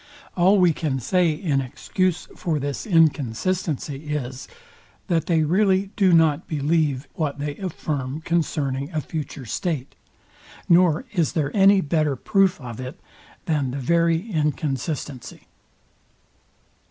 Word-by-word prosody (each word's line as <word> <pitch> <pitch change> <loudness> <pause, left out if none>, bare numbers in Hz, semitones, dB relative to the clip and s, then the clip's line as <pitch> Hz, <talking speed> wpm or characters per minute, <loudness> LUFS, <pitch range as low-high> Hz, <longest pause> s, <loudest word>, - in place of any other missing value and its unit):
All 190 +3 +4
we 180 -3 +4
can 145 -4 -2
say 175 +8 +2
in 150 -4 0
excuse 175 +7 -2
for 165 -3 -1
this 140 - -4
inconsistency 155 - 0
is, 130 -3 -5 0.6
that 165 -3 +1
they 165 -3 +3
really 190 +3 +2
do 195 -3 +4
not 160 -1 +3
believe 150 -2 0
what 145 -3 -2
they 145 0 -4
affirm 150 -7 -4
concerning 145 -5 -1
a 155 - 0
future 150 -3 -6
state; 145 - -3 0.7
nor 175 - +4
is 170 -6 +1
there 145 -3 -1
any 195 0 +6
better 150 -2 0
proof 195 - +2
of 120 -4 -8
it 130 +7 -7 0.5
than 150 -5 0
the 130 - -4
very 165 - +1
inconsistency. 150 -3 -3
155 Hz, 125 wpm, -23 LUFS, 140-175 Hz, 0.7 s, any